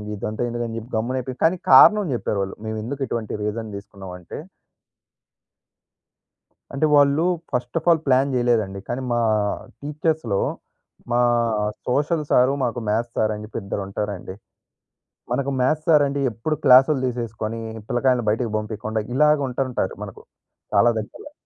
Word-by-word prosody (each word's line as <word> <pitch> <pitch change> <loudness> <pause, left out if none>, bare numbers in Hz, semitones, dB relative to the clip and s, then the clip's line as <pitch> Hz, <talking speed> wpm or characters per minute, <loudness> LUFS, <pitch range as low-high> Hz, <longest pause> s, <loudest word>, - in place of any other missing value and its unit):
ఇదంతా 105 +2 -5
ఎందుకని 120 -1 -4
చెప్పి 115 +1 -8
గమ్మున 120 +4 -1
అయిపోయి 130 0 -6
కానీ 165 +3 +3
కారణం 210 +10 +8
చెప్పారు 110 - -2
వాళ్ళు. 95 0 -4
మేము 110 0 -3
ఎందుకు 140 +5 -5
ఇటువంటి 115 -2 -4
రీజన్ 110 +1 -3
తీసుకున్నామంటే 95 -3 -10 2.4
అంటే 140 +3 +2
వాళ్ళు 145 +2 +4 0.3
ఫస్ట్ 125 0 -2
అఫ్ - - -4
ఆల్ 165 -2 +4
ప్లాన్ 135 +1 +3
చేయలేదండి. 115 -6 +1
కానీ 125 +2 -3
మా 120 - +1 0.6
టీచర్స్‌లో 150 -7 -1 0.7
మా 120 - +3 0.7
సోషల్ 150 +5 0
సార్ 125 +2 +4
మాకు 120 0 -2
మ్యాద్స్ 115 +3 -1
సార్ 110 0 +2
అని 105 - -7
చెప్పి 110 - -6
ఇద్దరు 100 +1 -4
ఉంటారండి. 100 -2 -5 1.0
మనకు 140 +2 0
మ్యాద్స్ 155 +4 +1
సార్ 150 -3 +6
అంటే 140 +1 -3
ఎప్పుడు 115 +8 -2
క్లాస్‌లు 135 +2 +6
తీసేసుకొని 115 -2 -4 0.3
పిల్లకాయలని 125 -1 +1
బయటకి 115 +1 -1
పంపియకుండా 110 0 -3
ఇలాగ 150 +3 +4
ఉంటుంటారు 125 -6 -2
మనకు, 100 -2 -9 0.5
చాలా 120 - +5
దగ్గరలో. 110 - -9
120 Hz, 135 wpm, -22 LUFS, 110-140 Hz, 2.4 s, కారణం